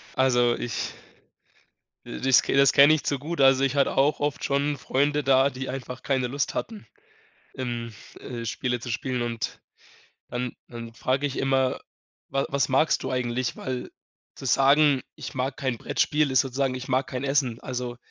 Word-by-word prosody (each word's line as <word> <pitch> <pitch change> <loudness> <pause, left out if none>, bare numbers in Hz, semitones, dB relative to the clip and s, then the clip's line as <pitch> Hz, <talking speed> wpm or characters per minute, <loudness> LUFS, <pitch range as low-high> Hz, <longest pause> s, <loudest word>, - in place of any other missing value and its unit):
Also, 125 -2 +3
ich 120 - -4 1.1
das 130 0 +3
das 140 0 +4
kenne 145 +2 +7
ich 155 - -3
zu 140 - 0
gut, 155 +4 -5
also, 135 0 +5
ich 135 0 0
hatte 140 - +2
auch 140 +3 +3
oft 145 -1 -2
schon 140 +1 0
Freunde 145 +2 0
da, 135 +1 +4
die 130 0 -6
einfach 125 -1 -6
keine 130 -2 0
Lust 140 +2 -2
hatten, 220 -2 -5 0.7
ähm, 120 -3 -4 0.3
äh, 120 -2 -6
Spiele 125 +2 -2
zu 120 - -7
spielen, 125 +2 -2
und 115 -1 -4 0.7
dann 125 0 -3 0.2
dann 115 -1 -9
frage 130 +3 0
ich 140 - -4
immer: 135 -1 +1 0.5
„Wa 135 0 -1
was 140 -1 0
magst 135 +4 +2
du 130 - -3
eigentlich?”, 125 -1 -1
weil 130 -1 -5 0.4
zu - - -8
sagen: 140 +1 +4
„Ich - - -7
mag 130 +1 -2
kein 130 -5 -2
Brettspiel“, 150 +4 +1
ist 130 - +4
sozusagen: 135 0 -1
„Ich 130 0 -6
mag 130 +1 +1
kein 130 0 -5
Essen.“ 135 -4 0
Also 125 -1 -4
130 Hz, 170 wpm, -25 LUFS, 125-140 Hz, 1.1 s, kenne